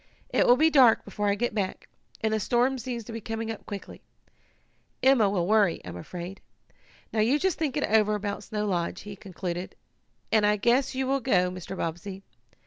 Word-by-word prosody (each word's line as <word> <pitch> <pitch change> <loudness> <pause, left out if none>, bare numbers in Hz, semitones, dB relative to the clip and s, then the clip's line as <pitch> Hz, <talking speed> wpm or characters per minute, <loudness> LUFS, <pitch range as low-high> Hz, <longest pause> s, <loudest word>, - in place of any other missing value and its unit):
"It - - +2
will 245 - +8
be 320 +3 +4
dark 255 -6 +6
before 205 0 -3
I 200 - +2
get 240 +2 -1
back, 200 -3 -3 0.3
and 220 0 +1
the 220 - +1
storm 245 +5 +1
seems 240 -1 -4
to 225 - -9
be 225 - -5
coming 225 +1 -4
up 220 - -9
quickly. 200 -2 -8 1.0
Emma 260 -6 +5
will 185 -3 0
worry, 205 -3 +3
I'm 90 -1 -7
afraid. 175 - -7 0.7
Now 220 - 0
you 235 +7 +3
just 375 +1 0
think 300 -3 -1
it 290 - 0
over 215 -1 +3
about 205 0 -4
Snow 210 -1 -3
Lodge," 175 -4 -2
he 205 0 -8
concluded, 180 -2 -6 0.6
"and 220 -1 +4
I 210 0 +4
guess 245 +6 +2
you 265 0 0
will 275 +1 +1
go, 180 -8 +2
Mr. 185 +1 -7
Bobbsey. 190 +4 -5
215 Hz, 195 wpm, -27 LUFS, 195-240 Hz, 1.0 s, will